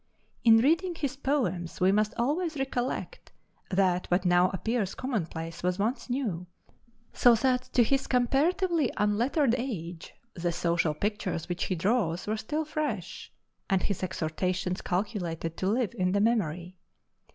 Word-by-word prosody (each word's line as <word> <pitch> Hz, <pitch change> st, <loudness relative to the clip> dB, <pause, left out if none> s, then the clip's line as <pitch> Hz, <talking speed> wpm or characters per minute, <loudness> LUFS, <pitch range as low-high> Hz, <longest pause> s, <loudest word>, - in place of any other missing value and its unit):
In 225 Hz, -1 st, +7 dB
reading 330 Hz, +9 st, +2 dB
his 285 Hz, -4 st, -2 dB
poems 220 Hz, -, -1 dB
we 185 Hz, +1 st, +4 dB
must 210 Hz, +1 st, +1 dB
always 310 Hz, +6 st, 0 dB
recollect 265 Hz, -2 st, -3 dB, 0.4 s
that 185 Hz, -2 st, +1 dB
what 180 Hz, +1 st, +1 dB
now 180 Hz, +1 st, +4 dB
appears 210 Hz, +1 st, -2 dB
commonplace 165 Hz, -, -4 dB
was 180 Hz, 0 st, 0 dB
once 225 Hz, +6 st, -1 dB
new, 215 Hz, -9 st, -2 dB, 0.7 s
so 245 Hz, -1 st, +6 dB
that 250 Hz, +2 st, +1 dB
to 245 Hz, -, +5 dB
his 270 Hz, +3 st, 0 dB
comparatively 300 Hz, -, +2 dB
unlettered 230 Hz, +6 st, +2 dB
age 175 Hz, -10 st, -5 dB, 0.2 s
the 175 Hz, 0 st, -1 dB
social 170 Hz, -2 st, 0 dB
pictures 200 Hz, -3 st, -2 dB
which 175 Hz, 0 st, -2 dB
he 185 Hz, -, -1 dB
draws 180 Hz, -2 st, 0 dB
were 215 Hz, -, -1 dB
still 300 Hz, +8 st, -2 dB
fresh, 290 Hz, -, -4 dB, 0.4 s
and 190 Hz, -1 st, +2 dB
his 200 Hz, -, -2 dB
exhortations 180 Hz, +1 st, -2 dB
calculated 175 Hz, -4 st, -2 dB
to 185 Hz, -, -1 dB
live 225 Hz, -2 st, 0 dB
in 185 Hz, 0 st, 0 dB
the 200 Hz, -, +2 dB
memory. 185 Hz, -5 st, 0 dB
205 Hz, 140 wpm, -28 LUFS, 180-255 Hz, 0.7 s, In